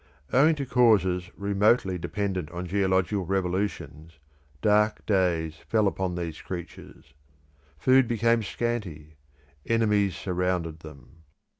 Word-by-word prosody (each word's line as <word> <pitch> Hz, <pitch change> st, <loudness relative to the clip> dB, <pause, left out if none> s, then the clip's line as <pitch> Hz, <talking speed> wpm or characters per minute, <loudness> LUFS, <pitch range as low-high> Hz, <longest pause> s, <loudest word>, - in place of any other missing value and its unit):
Owing 150 Hz, +5 st, +5 dB
to 140 Hz, -2 st, -4 dB
causes 95 Hz, -8 st, +2 dB
remotely 100 Hz, -1 st, +1 dB
dependent 95 Hz, -4 st, -3 dB
on 90 Hz, +1 st, -6 dB
geological 95 Hz, +1 st, 0 dB
revolutions, 90 Hz, -4 st, -3 dB, 0.4 s
dark 105 Hz, +4 st, +2 dB
days 85 Hz, -6 st, 0 dB
fell 110 Hz, -2 st, +2 dB
upon 95 Hz, -2 st, -2 dB
these 85 Hz, -3 st, -5 dB
creatures. 85 Hz, -5 st, -9 dB, 0.6 s
Food 130 Hz, -, +4 dB
became 115 Hz, 0 st, +2 dB
scanty; 95 Hz, -10 st, -4 dB, 0.5 s
enemies 105 Hz, -5 st, +1 dB
surrounded 90 Hz, -4 st, -2 dB
them. 75 Hz, -3 st, -14 dB
95 Hz, 105 wpm, -26 LUFS, 85-105 Hz, 0.6 s, Owing